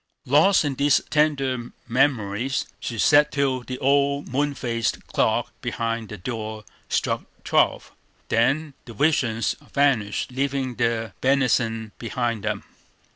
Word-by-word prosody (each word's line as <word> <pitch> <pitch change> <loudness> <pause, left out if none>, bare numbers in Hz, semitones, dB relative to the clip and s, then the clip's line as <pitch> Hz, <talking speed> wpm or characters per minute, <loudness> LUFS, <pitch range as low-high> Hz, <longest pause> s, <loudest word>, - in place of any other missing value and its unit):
Lost 155 +7 +4
in 145 - 0
these 140 +1 +3
tender 135 -5 +1 0.2
memories, 125 -1 +1
she 115 - -5
sat 150 +6 +5
till 140 -2 +1
the 125 +1 -6
old 140 +1 +2
moon 140 +3 -1
faced 115 -2 -2
clock - - 0
behind 115 -2 -3
the 105 - -7
door 110 +1 -5 0.2
struck - - 0 0.2
twelve, - - +1 0.4
then 140 +6 +1
the 115 - -10
visions 115 -5 +1 0.2
vanished, 130 -7 +1
leaving 135 0 -1
their 115 -2 -1
benison 120 -5 +1
behind 115 -2 -2
them. - - -2
130 Hz, 125 wpm, -24 LUFS, 115-140 Hz, 0.4 s, sat